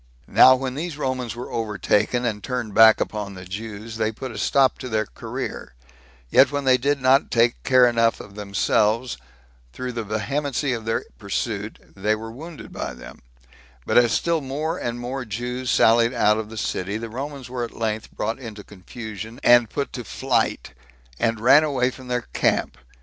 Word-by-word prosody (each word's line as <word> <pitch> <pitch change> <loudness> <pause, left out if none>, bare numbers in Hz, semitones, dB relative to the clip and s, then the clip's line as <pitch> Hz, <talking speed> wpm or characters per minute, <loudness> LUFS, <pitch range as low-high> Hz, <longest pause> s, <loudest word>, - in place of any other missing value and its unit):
Now 130 - +7
when 130 0 -3
these 155 +2 -4
Romans 130 -4 -2
were 120 - -7
overtaken, 110 +2 0
and 105 -3 -2
turned 125 -5 -3
back 110 0 +7
upon 105 -2 -3
the 90 0 -9
Jews, 110 +3 -7
they 110 -1 0
put 130 +3 -7
a 110 - -8
stop 135 +5 +3
to 130 - -6
their 110 -1 0
career; - - -6 0.6
yet 130 +1 +6
when 145 -1 -2
they 130 -1 +5
did 140 +3 +1
not 130 +2 +3
take 115 0 +2
care 130 -2 +5
enough 115 -1 +2
of 100 - -11
themselves 105 +3 0 0.6
through 125 0 -4
the 115 -1 -4
vehemency 130 +6 -1
of 115 -2 -5
their 115 - -1
pursuit, 105 +1 -3 0.2
they 105 +2 +1
were 110 +1 -7
wounded 150 -1 -10
by 65 - -5
them; - - -12 0.6
but - - -1
as 120 -2 +5
still 165 +7 +1
more 150 +5 -3
and 120 0 -3
more 130 +2 -4
Jews 125 +3 -4
sallied 115 +2 +4
out 105 +1 +3
of 110 -1 -5
the 110 - -9
city, 100 0 -2
the 115 +1 -5
Romans 135 +3 -6
were 125 -1 -4
at 115 - -5
length 110 -1 -2
brought 110 +4 -3
into 110 -5 -8
confusion, 110 +4 -9
and 120 -2 +6
put 140 - -3
to 125 - -5
flight, 80 - -1 0.5
and 115 -1 +1
ran 130 +7 +6
away 130 -4 +1
from 130 0 -12
their 125 -1 -1
camp. - - +1
115 Hz, 180 wpm, -23 LUFS, 110-130 Hz, 0.6 s, Now